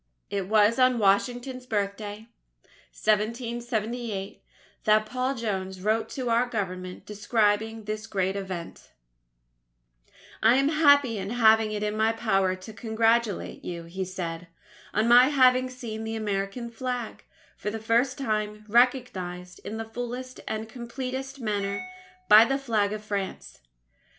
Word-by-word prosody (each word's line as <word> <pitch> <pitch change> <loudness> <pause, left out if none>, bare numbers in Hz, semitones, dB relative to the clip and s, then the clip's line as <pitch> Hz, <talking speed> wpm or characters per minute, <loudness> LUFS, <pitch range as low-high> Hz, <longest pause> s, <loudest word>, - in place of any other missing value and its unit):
It 195 -2 -2
was 215 +3 +4
on 255 -1 +4
Washington's 245 +5 +1
Birthday, 205 0 -3 0.6
1778, 230 -1 -2 0.4
that 215 0 +4
Paul 255 +4 -2
Jones 190 -5 -3
wrote 215 +4 0
to 255 -2 -4
our 235 +2 +3
Government 185 -5 -4
describing 210 +1 0
this 215 +1 -5
great 190 -1 -1
event: 185 -4 -7 1.5
"I 225 +3 +6
am 275 +2 +3
happy 285 -7 +4
in 195 +1 -4
having 220 -2 +4
it 210 0 -3
in 210 0 -1
my 220 +1 +2
power 195 -5 +1
to 185 +4 -11
congratulate 225 -1 0
you," 170 -1 -5
he 180 +3 -5
said, 180 -2 -5 0.4
"on 215 +2 +1
my 245 +1 +8
having 255 -2 +4
seen 230 -3 -6
the 225 0 -4
American 210 +2 -3
Flag, 245 -1 -4 0.3
for - - -4
the 220 - -4
first 235 +4 +1
time, 215 -4 -2
recognized 205 -7 +1
in 220 - -5
the 225 - -4
fullest 245 +3 -6
and 220 0 -3
completest 260 +3 -6
manner 205 - -2 0.4
by 215 +1 +9
the 270 +3 +1
Flag 220 -7 0
of 215 0 -5
France. 200 -2 -5
220 Hz, 135 wpm, -27 LUFS, 205-245 Hz, 1.5 s, by